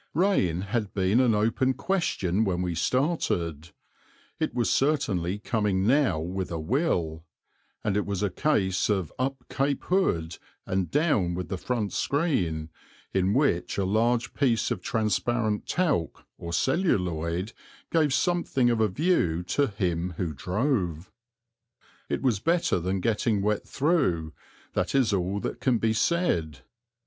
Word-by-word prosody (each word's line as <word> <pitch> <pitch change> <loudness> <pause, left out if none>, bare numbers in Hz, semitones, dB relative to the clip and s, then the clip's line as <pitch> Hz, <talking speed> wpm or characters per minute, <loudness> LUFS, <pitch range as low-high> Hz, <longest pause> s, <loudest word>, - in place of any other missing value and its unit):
Rain 150 - +2
had 105 +1 -3
been 95 +4 +2
an 120 -4 +4
open 115 +5 +1
question 125 - 0
when 90 -4 0
we 90 -1 -1
started; 85 - -1 0.7
it - - 0
was 120 -2 +1
certainly 105 - +1
coming 105 -3 0
now 130 - +3
with 90 +3 -3
a 85 - -3
will; 85 - -1 0.6
and 105 - 0
it 105 - +1
was 100 0 -2
a 100 - 0
case 95 -8 +1
of 95 -6 0
up 130 0 -2
cape 140 +1 -1
hood 85 - 0 0.3
and 95 -1 -1
down 125 - +1
with 90 0 -5
the 95 - -2
front 115 -3 -2
screen, 90 - 0 0.4
in 95 +2 +2
which 90 - +1
a 100 - +1
large 115 +4 +1
piece 120 -6 +1
of - - -2
transparent 110 0 0
talc, 155 - -1
or 85 - -6
celluloid, 90 - 0 0.4
gave 155 -4 +3
something 140 -5 +1
of 115 -1 +1
a 110 - +4
view 95 - +1
to 140 +10 +1
him 90 -4 -2
who 85 -4 -2
drove. 90 - -1 1.0
It - - -2
was 120 -7 +2
better 165 - +1
than 95 +2 -2
getting 105 -1 +1
wet 105 0 0
through, 135 - +1 0.4
that - - -1
is 130 -6 +3
all 95 +1 0
that - - -4
can 125 -3 +2
be 110 0 +1
said. 90 - 0
105 Hz, 145 wpm, -27 LUFS, 90-135 Hz, 1.0 s, an